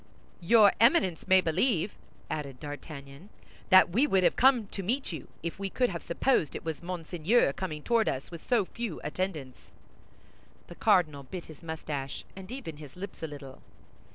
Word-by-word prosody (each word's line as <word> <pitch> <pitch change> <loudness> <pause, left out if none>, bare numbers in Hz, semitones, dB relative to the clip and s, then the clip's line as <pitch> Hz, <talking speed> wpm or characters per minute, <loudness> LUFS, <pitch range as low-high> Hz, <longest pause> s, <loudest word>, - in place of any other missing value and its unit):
"Your 210 +3 +6
Eminence 225 - +3
may 190 0 +6
believe," 185 +3 +1 0.3
added 140 -4 -5
D'Artagnan, 145 +3 -9 0.4
"that 185 -1 +7
we 250 +11 +3
would 190 -8 +3
have - - +4
come 255 -4 +5
to 195 - -6
meet 240 +7 -1
you, 160 -6 -7 0.2
if 170 +3 -4
we 195 0 -3
could 250 +3 +1
have 170 - -5
supposed 170 - +1
it - - -6
was 160 -2 -4
Monseigneur 175 - +1
coming 155 -5 -5
toward 230 -2 +2
us 135 +5 -4
with 170 -2 -8
so 230 -6 +2
few 230 -4 -5
attendants." 150 -5 -4 1.1
The - - -11
cardinal 155 -6 +3
bit 165 +7 -8
his 155 -3 -13
mustache, 155 -4 -5
and 190 +1 -10
even 205 - -6
his 150 -3 -11
lips 195 +3 -8
a 160 - -2
little. 140 -3 -10
175 Hz, 170 wpm, -29 LUFS, 150-200 Hz, 1.1 s, that